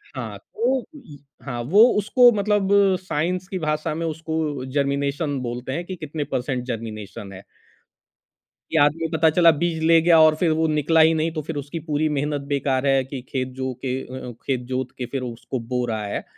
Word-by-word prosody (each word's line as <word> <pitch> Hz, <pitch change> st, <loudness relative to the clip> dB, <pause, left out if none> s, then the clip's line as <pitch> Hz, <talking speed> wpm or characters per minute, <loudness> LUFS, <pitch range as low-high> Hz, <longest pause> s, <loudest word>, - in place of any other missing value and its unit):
हाँ, -, -, -5 dB
तो 270 Hz, -, -1 dB
य 155 Hz, -, -13 dB, 0.3 s
हाँ, 120 Hz, -3 st, -4 dB
वो 190 Hz, -, +5 dB, 0.2 s
उसको 245 Hz, +4 st, +5 dB
मतलब 205 Hz, -2 st, +1 dB, 0.3 s
साइंस 180 Hz, +1 st, -2 dB
की 190 Hz, -, -4 dB
भाषा 155 Hz, 0 st, -1 dB
में 165 Hz, -, -3 dB
उसको 160 Hz, -3 st, -3 dB
जर्मिनेशन 140 Hz, +1 st, -1 dB
बोलते 125 Hz, +1 st, -5 dB
हैं 170 Hz, -, -3 dB
कि 185 Hz, -, -6 dB
कितने 155 Hz, -2 st, -5 dB
परसेंट 125 Hz, 0 st, -1 dB
जर्मिनेशन 110 Hz, -4 st, -6 dB
है 95 Hz, -, -11 dB, 1.3 s
कि 160 Hz, -, +1 dB
आदमी 165 Hz, +3 st, +1 dB
पता 160 Hz, 0 st, +4 dB
चला 170 Hz, +1 st, +5 dB
बीज 170 Hz, -2 st, 0 dB
ले 165 Hz, 0 st, +6 dB
गया 165 Hz, -1 st, +5 dB
और 155 Hz, 0 st, +6 dB
फिर 165 Hz, 0 st, +1 dB
वो 160 Hz, -, +2 dB
निकला 155 Hz, +1 st, +2 dB
ही 160 Hz, +1 st, +5 dB
नहीं 160 Hz, +1 st, 0 dB
तो 155 Hz, -, -3 dB
फिर 160 Hz, +2 st, -5 dB
उसकी 145 Hz, +4 st, -5 dB
पूरी 155 Hz, +1 st, +1 dB
मेहनत 145 Hz, 0 st, -1 dB
बेकार 135 Hz, -1 st, 0 dB
है 135 Hz, -1 st, +3 dB
कि 135 Hz, -1 st, -6 dB
खेत 130 Hz, -1 st, -2 dB
जो 130 Hz, -1 st, -3 dB
के 125 Hz, -, -1 dB
अ 130 Hz, -, -9 dB
अ, -, -, -6 dB
खेत 130 Hz, -2 st, 0 dB
जोत 130 Hz, 0 st, -3 dB
के 125 Hz, -, -3 dB
फिर 130 Hz, +2 st, -4 dB
वो 120 Hz, -, -4 dB
उसको 125 Hz, +2 st, -5 dB
बो 125 Hz, +1 st, -2 dB
रहा 110 Hz, -2 st, -3 dB
है 100 Hz, -, -4 dB
150 Hz, 200 wpm, -23 LUFS, 130-165 Hz, 1.3 s, ले